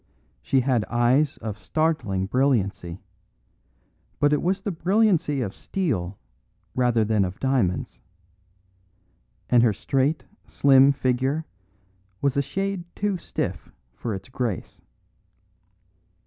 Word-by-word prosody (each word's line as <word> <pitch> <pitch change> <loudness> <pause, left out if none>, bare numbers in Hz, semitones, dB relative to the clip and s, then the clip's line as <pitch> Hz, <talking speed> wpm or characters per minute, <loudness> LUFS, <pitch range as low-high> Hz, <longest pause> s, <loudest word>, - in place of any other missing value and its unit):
She 135 - +2
had 125 -3 +1
eyes 125 +5 +2
of 110 -2 -4
startling 135 -13 0
brilliancy, 100 -8 0 1.2
but 145 0 +3
it 150 - +2
was 190 +3 0
the 205 - -2
brilliancy 175 -5 +2
of 100 -6 -3
steel 105 - -2 0.6
rather 120 -3 +2
than 105 -2 +2
of 90 0 -4
diamonds; 125 -10 0 1.5
and 120 -1 +5
her 115 -3 +4
straight, 135 +8 0 0.2
slim 135 0 +5
figure 135 +3 0 0.7
was 140 -2 +1
a 140 - +3
shade 195 +4 -3
too 205 -3 -1
stiff - - -4 0.2
for 110 - -4
its 95 0 -9
grace. 125 -6 -4
130 Hz, 110 wpm, -24 LUFS, 110-155 Hz, 1.5 s, and